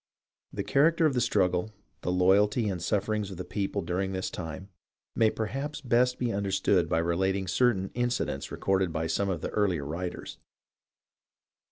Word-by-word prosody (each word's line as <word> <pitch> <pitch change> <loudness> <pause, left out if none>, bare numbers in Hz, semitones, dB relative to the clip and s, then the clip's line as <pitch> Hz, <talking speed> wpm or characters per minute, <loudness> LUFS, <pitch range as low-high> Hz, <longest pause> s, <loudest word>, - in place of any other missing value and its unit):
The - - -3
character 165 +4 +3
of 150 - +3
the 125 - +1
struggle, 100 -3 +1 0.3
the 90 - -1
loyalty 100 +5 +3
and 90 -3 -3
sufferings 105 +2 -1
of 95 - -8
the 90 - -5
people 100 -1 -2
during 95 +3 -2
this 95 0 -3
time, 90 +3 -6 0.5
may 110 -1 +4
perhaps 135 +8 -4
best 125 -1 +2
be 120 -2 -1
understood 100 -3 +1
by - - +1
relating 95 +3 0
certain 95 0 +1
incidents 120 - -2
recorded 95 -2 0
by 80 0 -2
some 100 +5 0
of 90 -4 -2
the - - -3
earlier 95 -9 0
writers. 90 +4 -5
95 Hz, 160 wpm, -28 LUFS, 90-115 Hz, 0.5 s, may